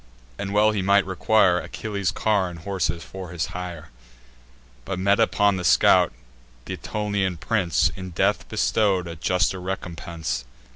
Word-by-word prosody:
and 100 - -3
well 105 +1 +4
he 105 -2 -1
might 100 +1 +4
require 95 -1 +3
Achilles' 100 -1 -3
car 100 -4 +1
and 85 - -9
horses, 90 -2 -2
for 95 +1 -8
his 85 -3 -2
hire: 85 -4 -6 0.9
But, 95 +6 -4
met 100 +3 +2
upon 105 -3 +3
the 90 - -4
scout, - - +5 0.5
th' - - -7
Aetolian 100 -4 -2
prince 90 -1 +1
In 95 -1 -7
death 85 - 0
bestow'd 100 -5 +1
a 85 - -6
juster 90 +2 0
recompense. 85 -7 -4
95 Hz, 145 wpm, -24 LUFS, 85-100 Hz, 0.9 s, scout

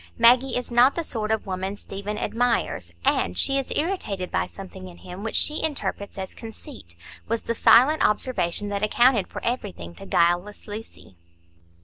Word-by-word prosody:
"Maggie 245 +3 +5
is 250 0 -5
not 245 +3 +5
the 335 - -1
sort 220 -8 -2
of 220 -1 0
woman 190 +1 -3
Stephen 200 +1 -6
admires, 220 - -1
and 90 +1 +1
she 275 0 +3
is 270 - -5
irritated 255 - -2
by - - 0
something 190 -1 -10
in 175 -1 -12
him 180 +2 -9
which 225 - -4
she 300 - +1
interprets 275 -10 -3
as 190 -1 -5
conceit," 215 - -11 0.3
was 230 +1 -1
the 230 - -1
silent 270 +7 +5
observation 205 -3 +1
that 200 -1 -2
accounted 230 0 +3
for - - -8
everything 200 - -3
to 85 - -12
guileless 175 +6 +1
Lucy. 210 - -9
210 Hz, 165 wpm, -24 LUFS, 185-245 Hz, 0.3 s, Maggie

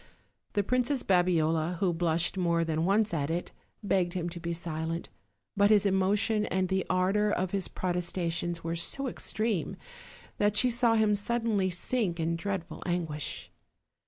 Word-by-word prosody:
The 205 - +1
Princess 250 +4 0
Babiola, 170 -2 +2
who 180 0 +1
blushed 170 +1 +1
more 170 -2 +1
than 160 0 0
once 205 +1 +2
at 145 -2 -1
it, 170 +2 -2 0.3
begged 185 -3 +1
him 175 -2 -2
to 175 0 -7
be 170 0 -4
silent, 165 0 -3 0.5
but 200 0 +4
his 210 -2 +5
emotion 200 +2 +2
and 185 -1 0
the 190 -1 +1
ardor 190 +3 +2
of 185 -2 -1
his 195 -2 -1
protestations 175 -1 -2
were 165 0 -2
so 275 +11 -2
extreme 215 -5 -2 0.6
that 205 0 +2
she 250 +2 +4
saw 235 -1 +3
him 215 -2 +3
suddenly 215 -2 0
sink 180 0 -2
in 165 +1 0
dreadful 185 0 -4
anguish. 165 -5 -3
185 Hz, 155 wpm, -29 LUFS, 170-205 Hz, 0.6 s, his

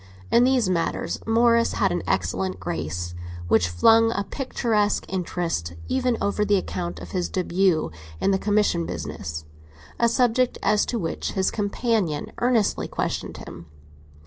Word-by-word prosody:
In 240 +1 +6
these 255 -5 +3
matters 170 -3 -1
Morris 230 +1 +4
had 195 - +1
an 175 - -1
excellent 95 +1 -1
grace, 85 0 -4 0.3
which 90 +1 +3
flung 225 - +5
a 200 - -1
picturesque 220 -6 0
interest 170 - -2
even 255 -3 +1
over 200 +1 0
the 205 0 +3
account 180 -2 -4
of - - -9
his 180 -2 -1
début 180 - +1 0.3
in - - +2
the 190 - +2
commission 205 -5 +1
business—a 80 - -5
subject 250 +1 +2
as 210 +1 +3
to 240 - -1
which 165 -6 -3
his 190 -2 +1
companion 205 -6 -1
earnestly 240 -4 +1
questioned - - -3
him. 85 0 -10
190 Hz, 140 wpm, -24 LUFS, -, 0.3 s, In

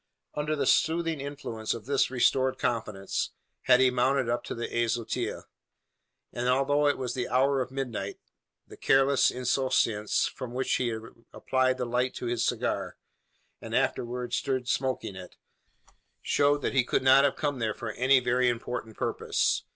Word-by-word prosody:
Under 150 +1 -1
the 140 -2 -1
soothing 160 +2 +2
influence 135 -7 -4
of 115 - -9
this 140 0 +1
restored 130 +1 +2
confidence, 110 -5 -2 0.3
had 125 -1 +6
he 130 -1 +4
mounted 130 0 +1
up 120 +1 -1
to - - -5
the 120 0 -4 0.2
azotea; 115 0 -2 0.9
and, 125 +1 -1
although 145 +3 +2
it 145 - +2
was 125 -2 -3
the 125 -2 -2
hour 135 +2 +2
of 125 - -3
midnight, 125 -7 -4 0.5
the - - -14
careless 135 0 +4
insouciance 125 -4 +1
with 130 - -4
which 130 +2 -1
he 125 -2 0 0.4
applied 130 0 0
the 125 - -2
light 125 +2 -1
to - - -5
his 120 -1 -1
cigar, - - -2 0.6
and - - -5
afterwards 120 0 -1
stood 130 -3 -2
smoking 130 -7 -1
it, 95 -1 -10 0.9
showed 145 0 +2
that - - -1
he 130 -2 +4
could 125 - 0
not 135 +1 +6
have 140 - +2
come 145 -3 -2
there 110 -2 -1
for 115 -2 -5
any 130 +4 +4
very 125 0 +2
important 120 -1 -4
purpose. - - 0
130 Hz, 160 wpm, -28 LUFS, 120-135 Hz, 0.9 s, had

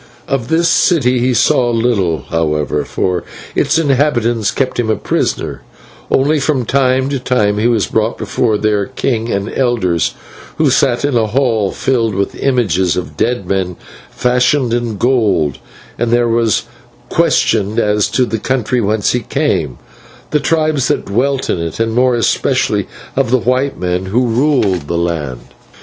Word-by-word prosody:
"Of 130 -4 -2
this 165 +1 +2
city 130 -9 +3
he 125 +1 +1
saw 120 +1 +3
little, 110 - 0
however, 75 -2 0
for 90 -2 -1 0.3
its - - +1
inhabitants 130 -7 +1
kept 130 -2 -2
him 115 -2 0
a 110 - +2
prisoner, - - -2 0.5
only 145 +3 +2
from 135 -3 0
time 130 +1 +2
to 140 -1 -2
time 105 -5 +1
he 110 - +2
was 115 -4 +2
brought 110 +1 -1
before 110 -4 0
their 105 -1 0
king 115 -3 -2
and 100 0 -1
elders, 115 -10 0 0.4
who - - +3
sat 125 +1 +2
in 145 -3 0
a 115 -2 +2
hall 115 -4 +1
filled 115 -6 0
with 100 0 -1
images 95 - 0
of 75 -4 -5
dead 120 +4 -1
men 95 -2 -1 0.3
fashioned 125 0 +1
in 120 -3 -2
gold, 105 - +1 0.4
and 120 - 0
there 120 0 +2
was 115 -2 +1 0.5
questioned 105 +2 +1
as 105 0 +2
to 130 - +1
the 115 -2 -3
country 125 0 0
whence 105 0 +1
he 125 - 0
came, 110 - -1 0.5
the 150 - +2
tribes 155 -4 +1
that - - -1
dwelt 135 +6 0
in - - -1
it, 85 +3 -4
and 115 0 0
more 125 +1 +3
especially 115 -3 0 0.3
of 135 -3 +1
the 130 - +4
white 130 +3 0
men 90 +1 -1
who 120 +7 +1
ruled 115 - +1
the 85 - -1
land. 75 -8 -3
115 Hz, 160 wpm, -15 LUFS, 100-130 Hz, 0.5 s, the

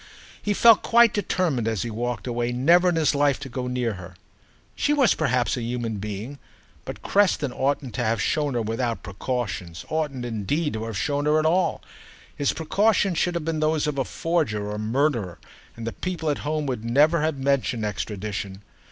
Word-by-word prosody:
He 205 -1 0
felt 230 0 +7
quite 235 -1 +5
determined, 175 - 0
as 110 -4 -1
he 115 - -4
walked 120 0 -3
away, 120 -1 -1
never 170 +9 +4
in 175 - 0
his 155 -3 +2
life 145 -2 +2
to 135 - -6
go 125 +1 -4
near 125 -2 -1
her. 90 0 -11 0.6
She 295 - +1
was 275 -5 +4
perhaps 130 -5 +1
a - - -3
human 115 -2 -3
being, 105 +7 -6 0.5
but - - -8
Creston 180 -9 +2
oughtn't 135 -2 -1
to 120 - -2
have 115 -1 0
shown 145 +2 0
her 120 - 0
without 115 +1 -2
precautions, 100 -5 -4
oughtn't 145 -6 -2
indeed 120 - -1
to 110 0 -3
have 115 -3 -4
shown 145 +4 -1
her 150 +1 +4
at 155 - +1
all. 175 +2 +1 0.5
His 145 - +1
precautions 195 +2 +1
should 175 0 0
have 170 -3 -2
been 160 -1 -1
those 155 0 +1
of 150 -2 -2
a - - +2
forger 130 -12 -1
or - - -3
a 105 - -4
murderer, 115 - 0 0.4
and 115 - -6
the 115 - -3
people 170 -4 -2
at 145 - -3
home 150 0 -2
would 125 -5 -3
never 150 +8 +3
have 155 -2 0
mentioned 135 -4 0
extradition. 100 -1 -4
135 Hz, 195 wpm, -24 LUFS, 115-155 Hz, 0.6 s, felt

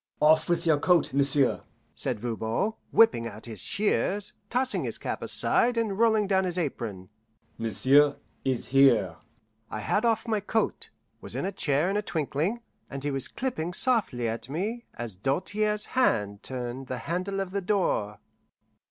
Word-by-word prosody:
"Off 155 +2 +4
with 175 - +1
your 155 -3 +3
coat, 175 -3 +3
m'sieu'," 140 -1 +2 0.3
said 125 -5 -2
Voban, 115 - -1 0.2
whipping 225 - +4
out 110 0 -10
his 110 -4 -7
shears, 205 - 0 0.2
tossing 255 +1 0
his - - -2
cap - - -4
aside, 240 0 +2
and 220 -4 0
rolling 220 -2 +4
down 190 -1 +2
his 180 -1 -2
apron. 115 - -4 0.5
"M'sieu' 130 +7 +3 0.3
is 130 -3 -2
here." 120 -10 +4 0.5
I 110 - -5
had 210 - 0
off 230 0 +1
my 220 -2 +1
coat, 220 +2 -2 0.3
was - - -9
in - - -2
a 195 - -1
chair 150 -3 +1
in 195 +2 0
a - - +1
twinkling, 170 - -2 0.3
and 140 -1 -6
he 145 - -1
was 135 -2 0
clipping 180 -10 -3
softly 200 - +1
at 115 +2 -3
me 210 - -3
as 120 -3 -4
Doltaire's 205 - +1
hand 105 - +1
turned 130 0 -5
the 130 - -4
handle 185 +3 -2
of 195 -2 -3
the 200 +1 -2
door. 180 - 0
155 Hz, 160 wpm, -27 LUFS, 120-205 Hz, 0.5 s, Off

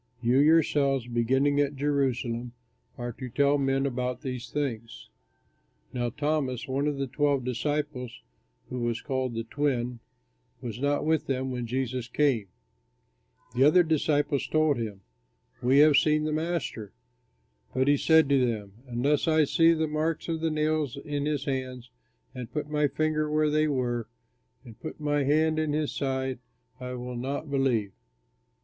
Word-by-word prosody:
You 125 +2 +3
yourselves, 145 -4 +3
beginning 130 +5 +2
at 145 0 +1
Jerusalem, 130 -4 -1 0.4
are 120 0 -4
to 130 +2 -7
tell 140 +3 +2
men 135 0 +1
about 125 -2 -2
these 125 -4 -5
things." 115 - -4 0.8
Now 120 -1 -1
Thomas, 145 -2 -1
one 135 +2 0
of 145 -2 -1
the 135 - -1
twelve 140 0 0
disciples, 125 -1 -3 0.5
who 125 - -4
was 120 -1 -1
called 130 -4 -2
"The 115 - -2
Twin," 125 -2 -1 0.6
was 120 -3 -6
not 145 +2 0
with 160 -1 +1
them 130 -1 -1
when 125 -2 -3
Jesus 125 0 -2
came. 125 -5 +1 1.1
The 125 +2 +3
other 155 +5 +6
disciples 150 -3 +1
told 155 -2 +2
him, 105 -4 -5 0.6
"We 130 +2 +3
have 150 -1 +6
seen 155 0 +3
the 155 0 -1
Master." 155 - -3 0.8
But 130 +1 +2
he 145 - +5
said 160 +1 +5
to 135 -2 +4
them, 105 -5 -2
"Unless 135 +6 +1
I 160 -1 +4
see 165 +3 +4
the 160 -1 +1
marks 155 +1 -2
of 165 -1 -2
the 165 - +1
nails 155 -3 0
in 145 0 -3
his 145 -2 -1
hands 130 -3 -4 0.4
and 125 -3 -7
put 150 -1 -3
my 150 -1 +2
finger 155 +1 0
where 150 0 +2
they 155 +1 +2
were 120 -5 -1 0.6
and 115 -2 -13
put 155 - -7
my 145 -2 0
hand 155 +2 +2
in 155 -2 0
his 150 -1 0
side, 130 -2 -2 0.4
I 125 0 -5
will 125 0 -6
not 140 +4 -4
believe." 125 -7 +1
135 Hz, 155 wpm, -27 LUFS, 125-150 Hz, 1.1 s, other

